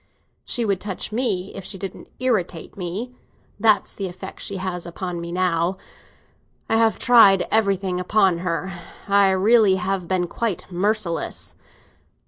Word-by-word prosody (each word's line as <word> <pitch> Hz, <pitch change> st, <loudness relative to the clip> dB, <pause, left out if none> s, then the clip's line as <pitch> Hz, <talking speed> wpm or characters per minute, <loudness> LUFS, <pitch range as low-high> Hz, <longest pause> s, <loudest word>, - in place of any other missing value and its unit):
"She 235 Hz, -, -1 dB
would 195 Hz, -3 st, 0 dB
touch 205 Hz, 0 st, -4 dB
me 210 Hz, -5 st, -1 dB
if 195 Hz, -, -7 dB
she 190 Hz, -, -4 dB
didn't 190 Hz, 0 st, -7 dB
irritate 200 Hz, -10 st, -1 dB
me. 200 Hz, +7 st, -5 dB, 0.5 s
That's 215 Hz, -2 st, +3 dB
the 195 Hz, -, -4 dB
effect 180 Hz, +1 st, -9 dB
she 200 Hz, -, -2 dB
has 180 Hz, -2 st, -4 dB
upon 175 Hz, 0 st, -5 dB
me 170 Hz, 0 st, -6 dB
now. 180 Hz, 0 st, 0 dB, 0.9 s
I 225 Hz, -, +2 dB
have 225 Hz, -1 st, +3 dB
tried 225 Hz, -6 st, +6 dB
everything 195 Hz, -4 st, +1 dB
upon 185 Hz, -1 st, +2 dB
her; 180 Hz, +1 st, -2 dB, 0.4 s
I 200 Hz, -1 st, +5 dB
really 200 Hz, +1 st, +4 dB
have 190 Hz, -1 st, -2 dB
been 185 Hz, -1 st, 0 dB
quite 210 Hz, +1 st, -3 dB
merciless. 190 Hz, -1 st, -1 dB
190 Hz, 140 wpm, -22 LUFS, 180-215 Hz, 0.9 s, tried